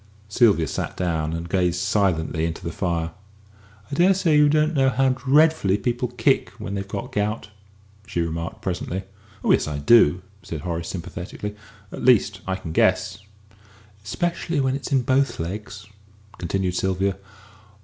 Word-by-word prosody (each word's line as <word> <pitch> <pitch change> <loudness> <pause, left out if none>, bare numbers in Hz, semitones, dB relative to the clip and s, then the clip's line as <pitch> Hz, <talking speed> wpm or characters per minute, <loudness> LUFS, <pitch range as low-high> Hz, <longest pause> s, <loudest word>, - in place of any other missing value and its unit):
Sylvia 100 -6 +4
sat - - -4
down 80 -3 -1
and 85 +1 -4
gazed 90 -1 +1
silently 90 -5 0
into 85 +2 -6
the 85 - -3
fire. 85 -3 -2 0.8
"I - - -5
dare 180 +6 +4
say 170 -5 +2
you 150 0 +6
don't 155 +2 +2
know 135 -3 +3
how 135 +1 +2
dreadfully 135 -4 +3
people 120 +2 -1
kick - - +1
when 100 - -6
they've 100 0 -3
got 100 0 -5
gout," 105 +1 -2 0.6
she 85 - -3
remarked 85 +1 -4
presently. 95 0 -3 0.4
"Oh - - +3
yes, - - +3
I 75 -2 -3
do," 90 +2 +5 0.2
said 80 -3 -6
Horace, 85 0 -4
sympathetically; 95 +3 -6 0.4
"at - - -7
least, 105 -6 +3
I 95 - 0
can 95 -4 -7
guess." 95 +3 +2 0.8
"Especially 165 - -2
when 130 -1 +1
it's 140 - -6
in 135 -2 +3
both 135 +2 +1
legs," 100 +4 -6 0.5
continued 90 +1 -1
Sylvia. 95 +1 0
95 Hz, 155 wpm, -23 LUFS, 85-130 Hz, 0.8 s, you